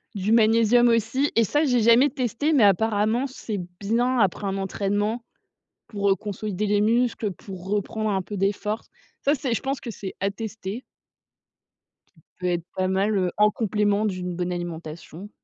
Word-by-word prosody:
du 200 +2 -1
magnésium 230 +1 +5
aussi. 230 +5 +1
Et 230 - +5
ça 295 +9 +1
j'ai 250 -4 +2
jamais 235 +5 +6
testé 255 +5 -1
mais 255 -7 +5
apparemment 220 +4 +2
c'est 220 -5 -5 0.2
bien 240 +5 +1
après 200 0 +1
un 195 0 -1
entraînement 205 +4 -1 0.6
pour, 200 -2 -1
heu, 195 - +4
consolider 210 +1 -4
les 205 0 +2
muscles, 230 -1 +1
pour 190 0 -10
reprendre 210 +1 -1
un 190 -1 0
peu 205 +2 -7
des 195 +2 +2
forces. 210 +3 -4 0.3
Ça 290 +2 +2
c'est 255 -3 -2
je - - -1
pense 275 0 -3
que 235 - -5
c'est 195 -2 -7
à 195 0 +1
tester 220 +1 -6 1.3
qui - - -22 0.2
peut 180 - -2
être 175 -2 0
pas 185 0 0
mal, 200 +2 +1
heu, 180 -2 +1
en 210 0 +4
complément 210 -1 +1
d'une 180 -2 -3
bonne 180 0 -2
alimentation. 170 +2 -7
210 Hz, 175 wpm, -24 LUFS, 195-230 Hz, 1.3 s, jamais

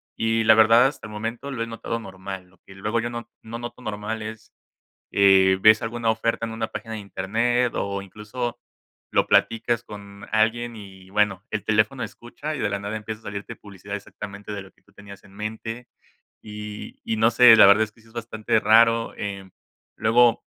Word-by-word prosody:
y 115 0 +1
la 110 0 +7
verdad 115 +3 +6
hasta 135 -4 -7
el 105 - -11
momento 115 +6 -5
lo 125 -4 -4
he 115 - -6
notado 115 0 -4
normal. 95 -2 -8
Lo 90 - -26
que 95 - -14
luego 105 +4 -1
yo 120 - -3
no 120 -1 -7
no 115 +1 -7
noto 120 +1 -8
normal 110 +1 -4
es, 110 0 -9 0.6
eh, 95 -1 +5
ves 110 +1 +7
alguna 115 0 -1
oferta 115 +1 -1
en - - -6
una 110 0 -2
página 115 -1 -7
de 110 - -5
internet, 115 +6 0
o, 100 0 -2
incluso, 110 +5 -5 0.5
lo - - +3
platicas 115 +1 +2
con 100 -1 -11
alguien 115 +2 +1
y, 95 -3 -12
bueno, 105 -2 +1
el 110 -2 -3
teléfono 110 +5 +1
escucha, 145 +6 -6
y - - -6
de 105 - +1
la 100 - -2
nada 100 +2 -4
empieza 110 0 -6
a - - -27
salirte 100 0 -6
publicidad 100 0 -9
exactamente 100 0 -9
de 100 -2 -5
lo 95 - -16
que - - -33
tú - - -27
tenías 100 -2 -13
en 95 - -18
mente. 110 +3 -6 0.6
Y 105 0 -8
y 110 - -2
no 115 +2 +4
sé, 120 -1 +8
la - - +9
verdad 100 +2 +6
es 105 - -16
que 115 - -24
sí 115 - -22
es 110 - -21
bastante 110 -2 -1
raro. 115 +1 +4
Em, 100 -2 -5 0.5
luego 115 +1 +4
110 Hz, 200 wpm, -24 LUFS, 100-115 Hz, 0.6 s, la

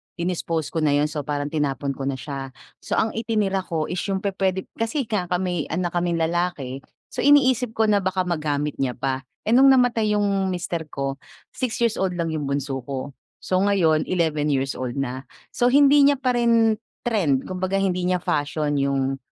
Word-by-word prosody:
Dinispose 170 -3 -2
ko 165 - -1
na 150 -2 +2
'yon, 145 +1 +2
so 150 -2 -4
parang 145 0 -2
tinapon 140 -2 -1
ko 135 0 -5
na 140 - -1
siya. 135 0 -6 0.3
So - - -3
ang 220 - +1
itinira 215 -4 0
ko 160 -3 -2
is 180 - -2
'yong 195 -1 -1
pupuwede 190 -1 0 0.2
kasi 230 +5 0
nga 200 -5 -1
ka 180 - 0
may 180 -5 -1
anak 175 +1 -2
kaming 175 -1 0
lalaki, 160 -6 -1 0.3
so - - -8
iniisip 260 -5 +4
ko 220 -1 +2
na 205 -1 +4
baka 190 -1 0
magamit 150 -4 -2
niya 130 -2 -1
pa. 135 0 -3 0.2
Eh, 220 - -1
no'ng 260 +3 +7
namatay 240 -5 +4
'yong 200 -2 +1
mister 175 -3 -3
ko, 135 -1 -4 0.3
6 250 -4 -3
years 230 -2 +1
old 190 -1 0
lang 165 -2 -2
'yong 150 -3 -3
bunso 140 -1 -2
ko. 135 +1 -5 0.3
So 185 - +1
ngayon, 185 -6 +2
11 160 -4 0
years 135 -2 0
old 125 -2 -4
na. 135 -1 -4 0.2
So, 245 - +2
hindi 285 +2 +6
niya 285 0 +6
pa 260 -2 0
rin 230 -2 +3 0.2
trend 175 - +1
kumbaga 185 +1 -3
hindi 185 -2 0
niya 180 -1 0
fashion 145 0 0
'yong 135 -1 0
175 Hz, 190 wpm, -23 LUFS, 145-205 Hz, 0.3 s, no'ng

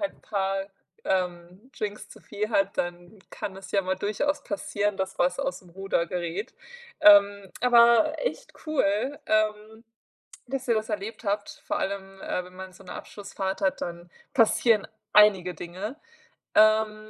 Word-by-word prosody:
halt 300 -1 -2
'n - - -26
paar, 195 -1 -2 0.4
ähm, 180 +5 -3
Drinks 210 0 -4
zu - - -14
viel 210 +2 -4
hat, 195 - +1
dann 175 +3 -4
kann 190 -1 -6
es 195 - -11
ja 200 - +2
mal 185 +1 -1
durchaus 250 +10 -1
passieren, 205 -1 -2
dass 190 0 -4
was 180 +8 +2
aus'm 270 -10 -4
Ruder 195 -2 -1
gerät. 180 +5 -4 0.5
Ähm, 200 -1 +6
aber 240 +4 +5
echt - - -4
cool, 260 -1 0
ähm, 215 +1 0 0.6
dass 265 0 -4
ihr 230 - +4
das 215 +1 -2
erlebt 210 +2 -5
habt, 205 +1 -3
vor - - -1
allem, 195 0 -4
äh, 180 - -2
wenn 180 0 -15
man 190 0 -9
so - - -16
'ne 180 - -8
Abschlussfahrt 195 -2 -5
hat, 190 - +1
dann 175 0 -6 0.2
passieren 225 -2 +4 0.3
einige 195 -4 +5
Dinge. 190 - -6 0.6
Ähm, 215 0 +4
200 Hz, 155 wpm, -26 LUFS, 190-220 Hz, 0.6 s, Ähm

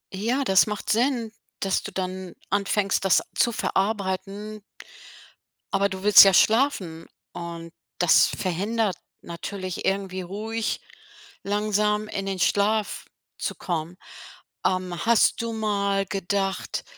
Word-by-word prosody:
Ja, 240 +8 0
das 195 -4 +4
macht 210 -1 -3
Sinn, 235 -1 +1 0.3
dass 195 -1 0
du - - -7
dann 185 -1 -5 0.2
anfängst, 200 -1 +1
das 195 - +3
zu 240 - +2
verarbeiten 205 0 -2 1.1
aber 200 0 +2
du 190 0 -7
willst 210 0 +10
ja 195 -1 +5
schlafen 210 - +2 0.2
und 170 -1 -8 0.2
das 175 -2 +5
verhindert 200 +3 -1 0.3
natürlich 185 +2 -6
irgendwie 190 -1 -1
ruhig, 215 +5 -3 0.6
langsam 210 +1 0
in 195 0 -4
den 195 -1 -2
Schlaf 205 +3 0 0.3
zu - - -3
kommen. 170 0 -4 0.7
Ähm, 185 -2 -1
hast 235 -1 +4
du 230 0 -3
mal 200 -3 0
gedacht, 195 0 -2
195 Hz, 115 wpm, -25 LUFS, 185-215 Hz, 1.1 s, willst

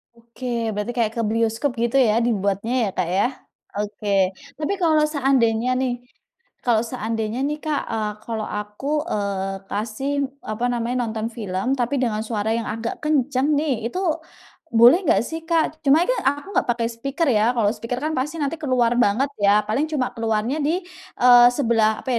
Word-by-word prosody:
Oke 235 +2 -12 0.3
berarti 210 +3 -3
kayak 225 -3 +1
ke - - +1
bioskop 230 +4 0
gitu 240 +3 +1
ya 220 -4 +4
dibuatnya 200 +1 0
ya - - -1
Kak 180 -2 0
ya, 205 - +3 0.5
oke. 210 0 -4 0.5
Tapi 310 +6 -1
kalau 310 -2 +4
seandainya 255 -4 +2
nih 250 -2 0 0.7
kalau 235 -2 +2
seandainya 225 -1 -3
nih 300 0 -2
Kak, 305 -2 0
eee, 215 -1 -1
kalau 225 -2 -3
aku, 240 +9 -3
eee, 195 - -2
kasih 220 +7 -3 0.3
apa 215 +3 -3
namanya, 240 +1 -2
nonton 220 0 -3
film 215 +3 -2
tapi 245 +4 0
dengan 215 -2 -1
suara 220 -1 -1
yang 230 - -3
agak 225 +2 -4
kenceng 285 -1 +1
nih, 260 -7 -1
itu 365 - -4 0.7
boleh 240 +9 +7
nggak - - +4
sih 325 0 -5
Kak? 320 -2 +1
Cuma 300 +5 +5
kan - - 0
aku 285 +6 -1
nggak - - +2
pakai 235 -1 +1
speaker 275 +8 -3
ya, 220 +2 +3
kalau 210 -3 +2
speaker 245 +2 -4
kan 310 - 0
pasti 295 +5 -2
nanti 285 +3 -1
keluar 250 -5 +2
banget 245 +6 +2
ya 205 +1 +4
paling 270 +8 +1
cuma 255 -4 -1
keluarnya 225 +4 -1
di 345 +5 0 0.4
eee, 245 -1 +8
sebelah 225 -5 +2
apa 250 -2 0
235 Hz, 170 wpm, -22 LUFS, 215-275 Hz, 0.7 s, eee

